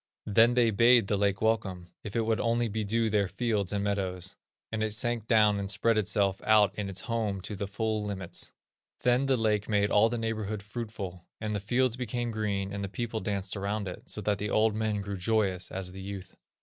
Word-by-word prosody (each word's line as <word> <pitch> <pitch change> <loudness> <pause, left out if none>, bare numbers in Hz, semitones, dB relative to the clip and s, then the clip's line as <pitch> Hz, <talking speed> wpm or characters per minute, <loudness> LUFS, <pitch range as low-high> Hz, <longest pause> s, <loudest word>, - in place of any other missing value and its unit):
Then 115 +3 +4
they 120 -2 +4
bade 115 +2 +6
the 100 - 0
lake 100 +1 +1
welcome, 95 -6 0
if 105 - -7
it 115 - +3
would 110 0 +1
only 115 0 +1
bedew 110 +1 0
their 105 -2 +2
fields 105 -3 -1
and 100 -1 -1
meadows; 95 -2 -2 0.4
and 110 -1 -2
it 110 -1 0
sank 115 -1 -1
down 105 -3 +4
and 100 -1 -4
spread 110 +3 +2
itself 100 -2 +1
out 110 -2 +5
in 100 -2 -4
its 95 0 -3
home 110 -4 -1
to 105 - -5
the 100 +1 -3
full 110 +1 -1
limits. 95 -4 -4 0.5
Then 125 +2 +3
the 135 -1 +3
lake 105 -2 +1
made 105 -1 +2
all 110 +2 +5
the 120 - -2
neighborhood 110 -2 -3
fruitful, 105 -5 -6
and 105 -1 -2
the - - 0
fields 120 +4 +1
became 120 -1 -2
green, 100 -3 -2
and 100 0 -3
the 100 - -3
people 115 +1 -3
danced 100 -2 -3
around 100 +1 -2
it, 90 - -6
so 105 - -3
that 105 -1 0
the 105 - -2
old 110 +1 +3
men 110 -1 -1
grew 100 0 -4
joyous 95 -2 0
as 95 -1 -4
the 95 +1 -9
youth." 95 -1 -7
105 Hz, 215 wpm, -29 LUFS, 100-115 Hz, 0.5 s, bade